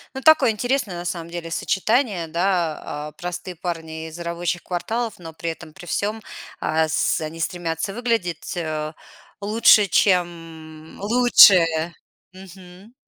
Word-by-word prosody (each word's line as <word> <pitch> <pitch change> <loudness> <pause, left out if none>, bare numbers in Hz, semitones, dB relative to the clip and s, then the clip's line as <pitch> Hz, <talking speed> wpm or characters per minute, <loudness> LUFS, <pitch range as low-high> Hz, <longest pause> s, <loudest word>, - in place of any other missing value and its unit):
Ну, 265 - -5
такое 295 -5 +6
интересное 245 -2 -1
на 175 0 -6
самом 170 -1 -4
деле 170 -1 -6
сочетание, 200 +1 0
да, 170 -4 -2
э, - - -40
простые 180 +1 -6
парни 160 -2 -5
из 160 +2 -11
рабочих 170 +1 -3
кварталов, 220 +6 -3
но 165 -2 -10
при 165 +1 -4
этом 160 -1 -8
при 175 +1 -12
всём 210 +6 -2 0.4
ас 160 -1 +1
они 160 +1 -6
стремятся 170 +1 -3
выглядеть 225 -9 -2 0.9
лучше, 210 0 +5
чем 165 -4 -1
лучшие. 185 -8 +5 0.4
Мгм. 185 +2 -14
175 Hz, 125 wpm, -22 LUFS, 165-205 Hz, 0.9 s, такое